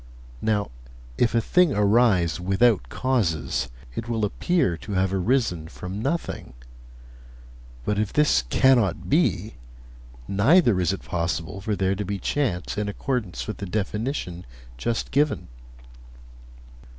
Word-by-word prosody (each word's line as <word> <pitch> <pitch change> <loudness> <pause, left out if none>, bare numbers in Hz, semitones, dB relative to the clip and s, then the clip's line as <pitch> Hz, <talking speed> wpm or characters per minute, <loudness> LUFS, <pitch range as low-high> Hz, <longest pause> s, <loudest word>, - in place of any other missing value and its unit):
Now, 105 - 0 0.5
if 120 -1 +2
a 115 - +4
thing 180 +5 +3
arise 100 -5 +3
without 95 +4 +2
causes, 95 - 0 0.2
it 115 - -5
will 110 -2 0
appear 135 - +1
to 105 - -7
have 95 0 +1
arisen 95 -5 0
from 90 +5 -6
nothing. 140 - -3 1.3
But 105 0 0
if 105 -2 -1
this 150 - +3
cannot 120 - +3
be, 115 - +1 0.7
neither 110 - +4
is 90 -1 +2
it 95 - -5
possible 85 +2 -3
for 105 +1 -1
there 95 -1 +1
to 100 +1 -3
be 100 +1 -3
chance 105 -4 -1
in 105 -1 -1
accordance 100 - -3
with - - -5
the 100 - -5
definition 105 - -3 0.3
just 115 - -2
given.' 145 - +1
105 Hz, 125 wpm, -24 LUFS, 90-120 Hz, 1.3 s, a